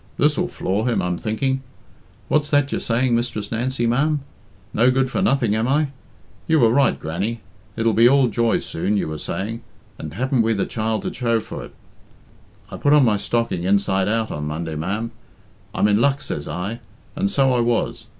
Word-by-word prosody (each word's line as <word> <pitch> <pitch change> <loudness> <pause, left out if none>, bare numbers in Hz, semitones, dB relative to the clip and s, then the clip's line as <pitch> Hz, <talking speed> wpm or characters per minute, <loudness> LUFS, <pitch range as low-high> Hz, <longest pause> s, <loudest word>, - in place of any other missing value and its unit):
This'll 155 +5 +2
floor 105 - -1
him, 120 - +1
I'm 90 0 -1
thinking. 130 +5 -1 0.7
What's 150 0 +1
that 145 -2 +2
you're - - -1
saying, 120 +1 +1
Mistress 115 -3 -2
Nancy, 120 +1 -1
ma'am? 145 +5 +1 0.5
No 120 +4 +4
good 130 0 +1
for 190 - -1
nothing, 135 - +2
am 110 +2 0
I? 145 +2 +2 0.6
You 160 -1 +4
were 115 -3 +5
right, 140 +2 +3
Grannie. 100 +8 -3 0.4
'It'll 115 0 +2
be 115 +3 +6
all 135 -1 +4
joy 115 0 +1
soon,' 100 +5 -2
you - - -1
were 80 -1 -5
saying, 110 +9 -4 0.4
and 75 0 -7
haven't 130 -1 +1
we 115 0 +2
the 100 - 0
child 110 -2 -2
to - - -3
show 115 -2 +1
for 110 - -7
it? - - -16 1.0
I - - -6
put 145 - +3
on 145 -3 +6
my 105 -3 +3
stocking 115 -4 -1
inside 95 0 +2
out 110 +1 0
on 75 0 -4
Monday, 80 +1 -4
ma'am. 100 +9 -3 0.6
'I'm - - +3
in 105 +2 +3
luck,' 140 +1 +2
says 75 - -4
I, 100 +7 -4 0.4
and 195 +6 0
so 135 -8 +3
I 125 - +2
was. 120 -1 0
115 Hz, 190 wpm, -21 LUFS, 105-135 Hz, 1.0 s, be